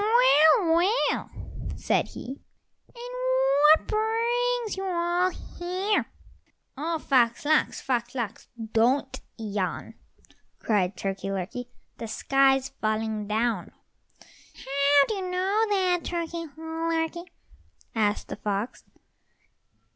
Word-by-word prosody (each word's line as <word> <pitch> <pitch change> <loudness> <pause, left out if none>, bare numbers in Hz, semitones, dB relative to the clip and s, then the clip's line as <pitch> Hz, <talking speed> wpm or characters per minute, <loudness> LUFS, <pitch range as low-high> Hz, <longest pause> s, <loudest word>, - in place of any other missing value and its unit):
"Well, 385 -7 +5
well," 380 +8 +1 0.5
said - - 0
he, 265 +3 -8 0.5
"and - - -8 0.5
what 310 +1 +6
brings 465 +2 0
you 385 - -5
all 350 0 +1
here?" 370 +3 -2 0.7
"Oh, 325 +4 -2
Fox 250 -4 +2
lox, 310 +1 +2
Fox 240 -1 -2
lox, 235 -5 -4 0.3
don't 255 +5 +2 0.2
yawn," 205 -4 -3 0.6
cried 190 -4 0
Turkey 195 +1 -3
lurkey, 195 +6 -4 0.3
"the 230 - -5
sky's 270 +3 +2
falling 215 -1 -1
down." 220 -3 -1 0.8
"How 280 +1 +3
do - - -1
you 395 - -3
know 390 +5 +1
that, 370 -3 +2
Turkey 335 -1 -3
lurkey?" 325 +1 -2 0.7
asked 210 -2 0
the - - -5
fox. 205 +4 -3
310 Hz, 100 wpm, -26 LUFS, 230-370 Hz, 0.8 s, what